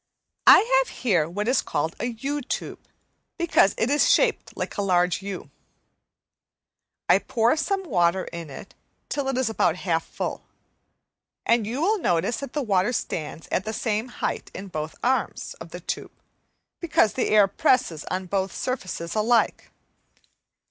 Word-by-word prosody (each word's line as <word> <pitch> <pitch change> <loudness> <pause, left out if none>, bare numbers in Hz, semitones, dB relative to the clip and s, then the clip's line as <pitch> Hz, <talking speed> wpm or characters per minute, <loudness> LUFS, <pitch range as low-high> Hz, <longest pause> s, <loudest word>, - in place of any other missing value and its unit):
I - - +10 0.2
have - - -3
here 175 -10 +2
what 205 +5 -3
is 255 - +3
called 160 +3 -2
a 240 - -1
U 275 +5 -3
tube, 260 - -4 0.6
because 340 - +3
it 225 - +1
is 290 - +4
shaped 485 -2 +1
like - - -4
a - - -1
large 180 -1 +2
U. 195 -1 -7 1.6
I - - +6
pour 235 +3 +1
some 390 +5 -1
water 185 - +2
in 170 -2 -7
it 140 +7 -10 0.4
till 285 -2 -2
it 270 -2 -1
is 260 -2 +1
about 180 -6 +1
half 165 -3 +1
full, - - -5 1.0
and 230 -2 +2
you 255 +7 -2
will 420 +4 +2
notice 185 - +1
that 275 -3 -7
the 295 - -1
water 205 +1 +1
stands 160 -7 -4
at 190 - +1
the 220 - -4
same 220 +1 -1
height 245 - -4
in 195 0 -7
both 155 -2 -5
arms 260 +2 0
of - - -8
the - - -8
tube, - - -5 0.7
because 310 - +2
the 255 - 0
air 210 -2 +6
presses 195 - +1
on 185 +1 -3
both 190 +1 -1
surfaces 185 -9 -4
alike. 225 +2 +1
215 Hz, 160 wpm, -25 LUFS, 180-255 Hz, 1.6 s, I